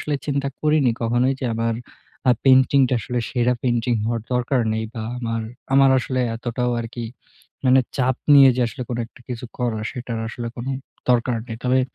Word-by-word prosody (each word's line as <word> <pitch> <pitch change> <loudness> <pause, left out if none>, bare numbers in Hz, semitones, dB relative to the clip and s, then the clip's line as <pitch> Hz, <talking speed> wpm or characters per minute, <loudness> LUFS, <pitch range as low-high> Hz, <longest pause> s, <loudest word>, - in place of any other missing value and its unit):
আসলে 150 - -2
চিন্তা 140 -1 0
করিনি 150 -4 +3
কখনোই 120 +3 +2
যে - - -3
আবার 115 0 0 0.5
আ - - +8
পেইন্টিংটা 130 0 +5
আসলে 125 +2 -3
সেরা 125 0 +2
পেইন্টিং 120 -1 +1
হওয়ার 115 +1 -1
দরকার 125 +1 +1
নেই 110 0 -1
বা 115 - -4 0.2
আমার 115 -2 -2 0.3
আমার 135 0 +6
আসলে 130 0 -2 0.2
এতটাও 125 +1 -2
আরকি 115 +1 -6 0.6
মানে 130 0 +6 0.2
চাপ 130 -2 +1 0.2
নিয়ে 135 -1 +9
যে - - 0
আসলে 120 +3 -6
কোনো 120 -1 -2
একটা 120 - -20
কিছু 125 -1 -5
করার 115 -3 -1
সেটার 120 -2 -5
আসলে 120 +1 -6
কোনো 120 +3 -4 0.4
দরকার 120 0 +2
নেই। 115 - -5
তবে 130 +1 +3
125 Hz, 175 wpm, -22 LUFS, 115-130 Hz, 0.6 s, নিয়ে